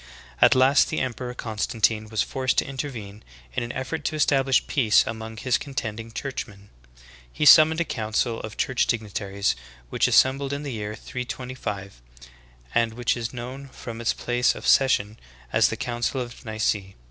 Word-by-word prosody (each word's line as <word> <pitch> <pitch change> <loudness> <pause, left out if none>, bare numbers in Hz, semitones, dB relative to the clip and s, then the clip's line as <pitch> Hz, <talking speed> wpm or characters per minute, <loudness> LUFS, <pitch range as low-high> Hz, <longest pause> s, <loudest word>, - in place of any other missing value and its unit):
At - - +7
last 130 +2 +5
the 155 - -1
emperor, 125 -1 -4
Constantine, 110 -1 -1
was 110 -1 +1
forced 130 -1 -1
to - - +3
intervene 120 -7 -6 0.3
in - - -1
an 120 0 -4
effort 150 +4 -4
to 155 - -1
establish 135 -3 +3
peace 120 -8 +4
among 110 0 -6
his 125 +2 +1
contending 115 -5 -5
churchmen. 105 -6 -6 0.6
He 150 - -1
summoned 160 +1 +8
a 170 - +1
council 115 -1 -1
o. 110 - -4
church 125 +3 0
dignitaries 100 - -1 0.4
which - - +2
assembled 135 +1 +3
in 140 +1 -4
the 140 -3 -4
year 105 -1 -4
325, 125 - -6 0.7
and 115 -1 +1
which 120 -1 0
is 115 -2 -4
known 130 +3 -7
from 115 -3 -8
its 115 - +1
place 125 0 +1
of - - -8
session 110 -6 +3 0.3
as - - +5
the - - -3
Council 120 +2 -2
of 120 0 -7
Nice. 110 0 +1
120 Hz, 160 wpm, -25 LUFS, 110-130 Hz, 0.7 s, summoned